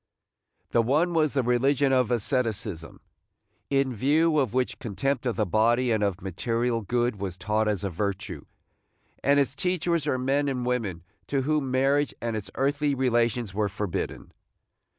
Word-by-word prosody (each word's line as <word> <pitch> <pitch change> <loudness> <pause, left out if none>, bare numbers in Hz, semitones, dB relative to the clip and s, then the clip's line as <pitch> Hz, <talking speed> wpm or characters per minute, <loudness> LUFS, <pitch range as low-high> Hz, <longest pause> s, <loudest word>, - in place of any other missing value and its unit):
The 120 - +4
one 150 +9 +2
was 155 -3 +2
the 135 - +2
religion 135 +3 +2
of 125 -3 +3
asceticism, 110 - -2 0.7
in 135 -2 +1
view 155 +7 +2
of 130 -7 +1
which 125 +1 -1
contempt 125 +4 -2
of 120 - 0
the 105 - +1
body 115 +6 +2
and 110 -2 +1
of 100 -1 -1
material 115 +5 -1
good 120 +1 0
was 95 -3 -5
taught 105 +3 0
as 105 -2 -1
a 100 - -1
virtue, 100 +2 -4 0.8
and 140 +1 +4
its 135 -2 +1
teachers 170 0 0
were 130 - +1
men 135 +3 +1
and 125 -2 -2
women 110 -9 -2 0.2
to 135 -2 0
whom 150 -1 0
marriage 135 +3 +2
and 115 -1 -2
its 105 -2 -5
earthly 145 +1 +1
relations 120 -4 +1
were 105 0 0
forbidden. 100 -2 -4
125 Hz, 160 wpm, -26 LUFS, 110-140 Hz, 0.8 s, The